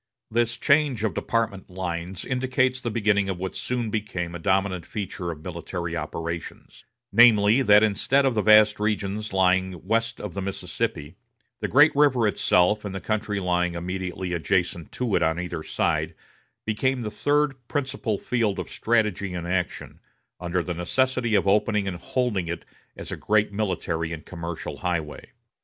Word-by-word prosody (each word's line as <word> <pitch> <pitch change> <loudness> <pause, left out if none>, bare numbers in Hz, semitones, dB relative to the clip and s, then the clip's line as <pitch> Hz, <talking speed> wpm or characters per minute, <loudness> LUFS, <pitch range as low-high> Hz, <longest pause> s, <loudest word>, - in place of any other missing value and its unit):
This 120 +1 +1
change 140 -6 +2
of 110 -5 0
department 110 -1 -2
lines 90 0 -4
indicates 130 0 0
the 120 - -2
beginning 105 -3 +1
of 95 - -2
what 95 +1 -5
soon 120 -3 -2
became 95 -6 -3
a 85 - -6
dominant 95 0 +1
feature 95 -3 -5
of 80 -2 -7
military 85 0 -5
operations; 85 +1 -6 0.3
namely, 110 +1 +6
that 105 -3 +6
instead 125 +6 +2
of 135 - +2
the 110 - +1
vast 110 0 +6
regions 105 0 -2
lying 95 -2 +1
west 115 +3 0
of 105 -5 -6
the 100 - -4
Mississippi, 95 -5 -3 0.4
the - - -2
great 145 +5 +5
river 135 -6 +4
itself, 105 +1 +2
and 100 -2 -5
the - - -3
country 110 -1 -2
lying 90 -1 0
immediately 90 +1 -4
adjacent 90 0 -1
to 120 -5 -1
it - - +2
on 80 0 +1
either 90 -2 -4
side, - - -1 0.5
became 125 +4 0
the 105 - -4
third 145 +5 +1
principal 130 -6 -2
field 115 -4 0
of - - -5
strategy 105 -5 0
and 85 -1 -4
action, 90 0 -3 0.4
under 90 0 -1
the 90 - -3
necessity 120 +6 0
of 100 - +2
opening 105 0 +2
and 90 -2 -3
holding 105 -3 -1
it 85 +1 -5 0.3
as - - -7
a - - -2
great 105 -1 +1
military 85 -6 -2
and 80 - -8
commercial 85 -2 -6
highway. 80 -4 -3
100 Hz, 160 wpm, -25 LUFS, 90-115 Hz, 0.5 s, namely